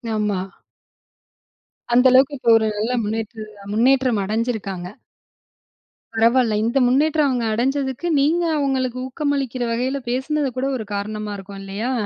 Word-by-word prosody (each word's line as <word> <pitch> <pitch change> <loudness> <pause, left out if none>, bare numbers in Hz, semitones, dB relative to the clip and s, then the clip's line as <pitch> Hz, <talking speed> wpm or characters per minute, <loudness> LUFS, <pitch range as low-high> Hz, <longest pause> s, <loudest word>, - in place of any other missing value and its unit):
ஆமா. 210 -3 0 1.5
அந்த 250 +2 +5
அளவுக்கு 265 +2 +4
இப்போ 240 -2 0
1 220 -1 0
நல்ல 235 +4 -1
முன்னேற்று 220 +1 -4 0.3
முன்னேற்றம் 255 -1 +3
அடைஞ்சிருக்காங்க. 210 -4 -3 1.3
பரவால்ல, 230 +1 +3
இந்த 235 +4 0
முன்னேற்றம் 295 +4 +3
அவங்க 250 -3 0
அடைஞ்சதுக்கு, 265 +6 -1
நீங்க 320 +5 +2
அவங்களுக்கு 260 -3 -1
ஊக்கமளிக்கிற 270 -2 -2
வகையில 255 +4 -1
பேசினது 270 +3 -1
கூட 260 - 0
ஒரு 220 -4 -7
காரணமா 210 +1 -4
இருக்கும் 195 0 -10
இல்லையா? 200 +6 -3
245 Hz, 120 wpm, -21 LUFS, 215-270 Hz, 1.5 s, அந்த